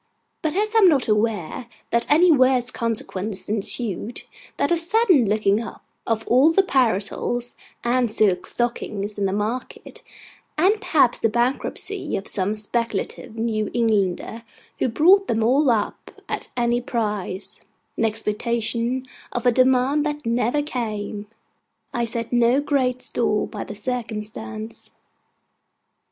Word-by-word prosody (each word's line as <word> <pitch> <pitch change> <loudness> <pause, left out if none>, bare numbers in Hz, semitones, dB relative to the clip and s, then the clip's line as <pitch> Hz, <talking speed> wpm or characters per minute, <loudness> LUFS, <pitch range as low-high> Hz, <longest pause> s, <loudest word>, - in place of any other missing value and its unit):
But 315 0 -2
as 425 +2 0
I 450 - +5
am 385 -4 +7
not 280 -6 +2
aware 215 0 -1 0.2
that 235 0 +1
any 335 +4 +6
worse 255 -3 +3
consequence 210 -4 -3
ensued, 215 +1 -3 0.3
than - - +2
a - - +4
sudden 345 - +3
looking 210 0 +2
up 230 - -9 0.2
of 225 -1 -1
all 265 +6 +5
the 390 +4 +4
parasols 240 - 0 0.3
and 240 -1 +1
silk 205 -4 +1
stockings 215 -4 -3
in 200 - +1
the - - -1
market; 215 +5 -4 0.6
and 395 +7 +3
perhaps 280 - +3
the 225 - +2
bankruptcy 255 - 0
of 195 - -7
some 200 +2 -1
speculative 220 0 -3
New 220 -2 -1
Englander 220 -1 0 0.4
who - - +1
bought 365 - +5
them 225 -1 0
all 265 +5 +3
up 220 -3 -2
at - - -4
any 240 0 +1
price, 210 -6 -3 0.4
in - - -1
expectation 230 +3 -1 0.3
of 245 - -3
a 245 - +6
demand 260 +3 +3
that 295 -2 -3
never 240 +5 +1
came; 215 -7 -4 0.7
I 235 -1 0
set 230 +1 -3
no 240 +2 +4
great 260 -3 0
store 220 -4 0
by - - -6
the 205 - -8
circumstance. 220 -1 -6
235 Hz, 135 wpm, -22 LUFS, 215-260 Hz, 0.7 s, am